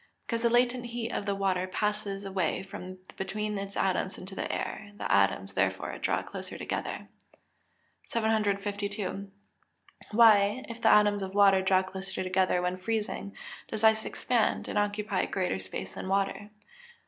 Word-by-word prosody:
_ -, -, -31 dB, 0.2 s
Because 230 Hz, -1 st, -2 dB
the 235 Hz, -, +3 dB
latent 245 Hz, +1 st, +2 dB
heat 235 Hz, 0 st, -3 dB
of 205 Hz, -, -3 dB
the 200 Hz, -, +1 dB
water 185 Hz, -2 st, 0 dB
passes 205 Hz, 0 st, -2 dB
away 190 Hz, -3 st, -1 dB
from 185 Hz, -1 st, -8 dB, 0.2 s
between 210 Hz, +2 st, -2 dB
its 200 Hz, 0 st, -6 dB
atoms 190 Hz, 0 st, 0 dB
into 190 Hz, +1 st, -9 dB
the -, -, -3 dB
air; 205 Hz, -1 st, -4 dB
the -, -, -3 dB
atoms, -, -, +2 dB
therefore, -, -, 0 dB
draw -, -, 0 dB
closer -, -, -7 dB
together. -, -, -4 dB, 1.0 s
752. 205 Hz, -2 st, -1 dB, 0.8 s
_Why, 215 Hz, +2 st, +5 dB
if 235 Hz, 0 st, -8 dB
the -, -, +5 dB
atoms 205 Hz, -1 st, +5 dB
of 190 Hz, 0 st, -5 dB
water 195 Hz, -2 st, +6 dB
draw 190 Hz, 0 st, +3 dB
closer 190 Hz, 0 st, -5 dB
together 185 Hz, -1 st, +2 dB
when 180 Hz, +1 st, -1 dB
freezing, 210 Hz, 0 st, -3 dB, 0.3 s
does 220 Hz, 0 st, -5 dB
ice 220 Hz, 0 st, +5 dB
expand, 240 Hz, -3 st, 0 dB
and 210 Hz, -, 0 dB
occupy 205 Hz, -1 st, 0 dB
greater 180 Hz, -, -1 dB
space 95 Hz, 0 st, -6 dB
than -, -, -6 dB
water? 195 Hz, +2 st, 0 dB
200 Hz, 155 wpm, -29 LUFS, 190-215 Hz, 1.0 s, water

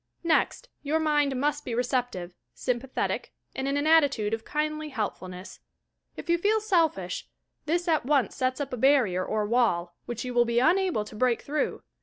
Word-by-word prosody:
Next, 335 Hz, +8 st, +1 dB
your 305 Hz, +2 st, 0 dB
mind 295 Hz, -3 st, +2 dB
mu 280 Hz, -, 0 dB
'rt 295 Hz, 0 st, -2 dB
be 235 Hz, -, -3 dB
receptive, 245 Hz, -8 st, -1 dB, 0.2 s
sj 250 Hz, -2 st, -1 dB
mpathetic 270 Hz, 0 st, -2 dB, 0.3 s
and 265 Hz, +1 st, -2 dB
in 275 Hz, +1 st, 0 dB
an 285 Hz, -, 0 dB
attitude 280 Hz, -10 st, +3 dB
of 225 Hz, 0 st, -2 dB
kindly 305 Hz, +2 st, -2 dB
helpfulness. 185 Hz, -6 st, -5 dB, 0.6 s
If -, -, -8 dB
you 340 Hz, 0 st, +2 dB
feel 425 Hz, +4 st, +2 dB
selfish 325 Hz, -, 0 dB, 0.4 s
this 345 Hz, +3 st, 0 dB
at 320 Hz, -2 st, +2 dB
once 275 Hz, -1 st, +1 dB
sets 255 Hz, +1 st, -1 dB
up 275 Hz, -2 st, -4 dB
a -, -, -2 dB
barrier 240 Hz, -9 st, +3 dB
or 215 Hz, +1 st, -1 dB
wall, 205 Hz, -7 st, +1 dB
which 240 Hz, 0 st, -4 dB
you 250 Hz, -, -4 dB
will 240 Hz, 0 st, +5 dB
be 235 Hz, 0 st, -1 dB
unable 340 Hz, -, +3 dB
to 215 Hz, -, -11 dB
break 245 Hz, +1 st, +1 dB
through. 295 Hz, +1 st, -2 dB
265 Hz, 185 wpm, -27 LUFS, 230-305 Hz, 0.6 s, will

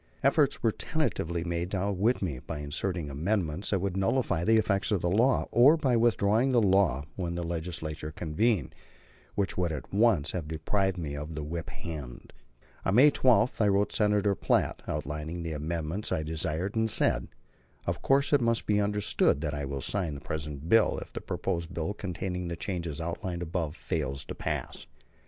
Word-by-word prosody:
Efforts 140 Hz, 0 st, +3 dB
were 115 Hz, -, +4 dB
tentatively 85 Hz, -, -2 dB
made 85 Hz, 0 st, -2 dB
to 95 Hz, -, -2 dB
outwit 100 Hz, +5 st, +1 dB
me, 75 Hz, -9 st, -2 dB
by 75 Hz, +3 st, -6 dB
inserting 75 Hz, +2 st, -3 dB
amendments 85 Hz, +3 st, -1 dB
that 100 Hz, -, +2 dB
would 100 Hz, -1 st, -2 dB
nullify 95 Hz, -3 st, +1 dB
the 110 Hz, +4 st, +4 dB
effect 105 Hz, -2 st, +1 dB
of 105 Hz, -, +2 dB
the 85 Hz, -, +1 dB
law, 120 Hz, +7 st, +3 dB
or 140 Hz, +7 st, +6 dB
by 135 Hz, -6 st, +2 dB
withdrawing 115 Hz, +2 st, +3 dB
the 125 Hz, -, +4 dB
law 95 Hz, -, +3 dB
when 85 Hz, -2 st, -2 dB
the 85 Hz, -, -2 dB
Legislature 80 Hz, -2 st, -4 dB
convened; 90 Hz, -, 0 dB, 0.6 s
which 100 Hz, -3 st, -1 dB
would 90 Hz, -2 st, +1 dB
at 75 Hz, 0 st, -6 dB
once 100 Hz, -8 st, +3 dB
have 85 Hz, -4 st, -4 dB
deprived 95 Hz, +5 st, 0 dB
me 75 Hz, -4 st, -4 dB
of 75 Hz, +2 st, -6 dB
the 75 Hz, -, -4 dB
whip 80 Hz, +1 st, -5 dB
hand. 75 Hz, -8 st, -8 dB, 0.5 s
On 95 Hz, -, +1 dB
May 145 Hz, +5 st, +8 dB
12 120 Hz, -4 st, +3 dB
I 105 Hz, -, +4 dB
wrote 100 Hz, +1 st, +2 dB
Senator 105 Hz, -1 st, +2 dB
Platt, -, -, +1 dB
outlining 75 Hz, +3 st, -4 dB
the 80 Hz, -1 st, -3 dB
amendments 80 Hz, +6 st, -3 dB
I 80 Hz, -, 0 dB
desired, 80 Hz, +5 st, -2 dB
and 110 Hz, 0 st, +2 dB
said: -, -, +2 dB, 0.6 s
"Of -, -, -2 dB
course 140 Hz, +2 st, +3 dB
it 145 Hz, -, +5 dB
must 115 Hz, -1 st, +1 dB
be 105 Hz, -1 st, +2 dB
understood 105 Hz, -8 st, +2 dB
that 75 Hz, -2 st, -2 dB
I 70 Hz, -1 st, -3 dB
will 70 Hz, 0 st, -4 dB
sign 85 Hz, -2 st, -1 dB
the 70 Hz, -, -8 dB
present 75 Hz, -1 st, -5 dB
bill 110 Hz, +4 st, +4 dB
if -, -, -8 dB
the -, -, -5 dB
proposed 85 Hz, +1 st, -3 dB
bill 85 Hz, +5 st, -2 dB
containing 90 Hz, -2 st, -4 dB
the 85 Hz, -, -3 dB
changes 85 Hz, -4 st, -4 dB
outlined 85 Hz, +1 st, -3 dB
above 80 Hz, -2 st, -3 dB
fails 70 Hz, -6 st, -3 dB
to -, -, -6 dB
pass." -, -, -4 dB
90 Hz, 185 wpm, -29 LUFS, 80-105 Hz, 0.6 s, May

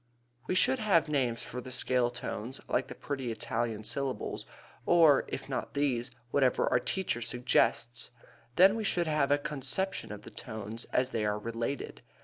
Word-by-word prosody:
We 185 Hz, -, 0 dB
should 260 Hz, +7 st, +4 dB
have 190 Hz, -8 st, +3 dB
names 125 Hz, -6 st, 0 dB
for 125 Hz, -, -6 dB
the 130 Hz, -, -9 dB
scale 125 Hz, -1 st, +2 dB
tones 125 Hz, +1 st, -5 dB
like -, -, 0 dB
the -, -, -8 dB
pretty 135 Hz, -4 st, -3 dB
Italian 115 Hz, 0 st, -2 dB
syllables, 135 Hz, +3 st, -3 dB, 0.4 s
or, 160 Hz, -5 st, +6 dB
if -, -, -5 dB
not -, -, -4 dB
these, 130 Hz, -4 st, +1 dB, 0.2 s
whatever 130 Hz, -3 st, +3 dB
our -, -, +3 dB
teacher 175 Hz, -4 st, -1 dB
suggests. 120 Hz, -1 st, +1 dB, 0.5 s
Then 190 Hz, +3 st, +7 dB
we 225 Hz, -, -2 dB
should 175 Hz, -4 st, +1 dB
have 150 Hz, -3 st, +1 dB
a 145 Hz, -, +5 dB
conception 150 Hz, -, -2 dB
of 105 Hz, 0 st, -8 dB
the -, -, -10 dB
tones 110 Hz, -1 st, -6 dB
as 125 Hz, +1 st, 0 dB
they 110 Hz, -, -1 dB
are 105 Hz, 0 st, +1 dB
related. 115 Hz, +5 st, -4 dB
130 Hz, 165 wpm, -31 LUFS, 115-150 Hz, 0.5 s, Then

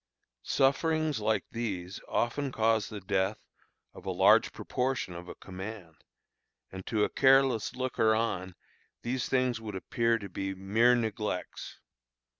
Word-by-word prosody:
Sufferings 155 Hz, +1 st, +1 dB
like 110 Hz, -1 st, 0 dB
these 95 Hz, -6 st, -4 dB
often 135 Hz, +3 st, -1 dB
cause 110 Hz, -2 st, +1 dB
the 105 Hz, -, -6 dB
death 95 Hz, +2 st, 0 dB, 0.6 s
of -, -, -12 dB
a -, -, -4 dB
large -, -, +5 dB
proportion 125 Hz, -7 st, -2 dB
of 90 Hz, +1 st, -9 dB
a -, -, -8 dB
command; 95 Hz, -5 st, -9 dB, 0.7 s
and 95 Hz, 0 st, -8 dB
to 110 Hz, -2 st, +1 dB
a -, -, +3 dB
careless 135 Hz, -4 st, +3 dB
looker 125 Hz, -4 st, +2 dB
on 95 Hz, -5 st, -2 dB, 0.5 s
these 125 Hz, +1 st, -2 dB
things 125 Hz, -3 st, +1 dB
would 105 Hz, -3 st, -6 dB
appear 115 Hz, +4 st, +1 dB
to 100 Hz, -3 st, -7 dB
be 95 Hz, +1 st, -4 dB
mere 110 Hz, +6 st, +3 dB
neglects. 110 Hz, -5 st, -3 dB
110 Hz, 135 wpm, -30 LUFS, 95-125 Hz, 0.7 s, large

